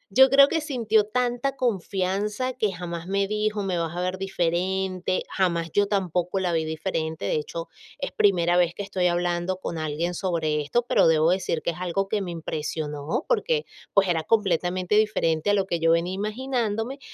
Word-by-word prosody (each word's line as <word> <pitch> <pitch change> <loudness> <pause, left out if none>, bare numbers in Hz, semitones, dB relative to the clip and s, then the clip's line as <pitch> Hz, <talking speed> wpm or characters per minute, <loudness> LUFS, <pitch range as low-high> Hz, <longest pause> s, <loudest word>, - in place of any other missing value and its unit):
yo 265 0 +8
creo 275 +1 +7
que 325 +1 0
sintió 225 -8 +1
tanta 250 +3 -1
confianza 205 +2 -1
que 215 -5 0
jamás 170 -1 -6
me 195 0 +1
dijo: 210 0 -1
"Me 180 -3 -1
vas 165 0 -3
a 180 - -1
ver 185 +1 -2
diferente", 185 0 -1
jamás 170 -4 0
yo 205 0 +2
tampoco 185 -2 -1
la 180 -2 0
vi 160 -1 +1
diferente. 160 0 -3
De - - 0
hecho, 165 +2 -3 0.3
es - - -4
primera 175 -4 +3
vez 175 -1 +2
que 205 - -4
estoy 185 -2 0
hablando 175 +1 0
con 170 -3 -5
alguien 155 +3 -2
sobre 165 -4 -1
esto, 235 +12 0
pero 245 - +4
debo 160 +1 +4
decir 180 -3 -1
que - - 0
es 165 - -10
algo 185 +2 -1
que 210 -2 0
me 180 - -4
impresionó, 155 - -3
porque, 485 -1 +1 0.3
pues, 195 -1 +5
era 165 -2 +1
completamente 185 -1 0
diferente 205 -5 +1
a 205 - +4
lo 195 -1 +1
que 170 -3 -2
yo 165 - +2
venía 170 +2 0
imaginándome, 225 +3 -2
185 Hz, 185 wpm, -25 LUFS, 170-210 Hz, 0.3 s, yo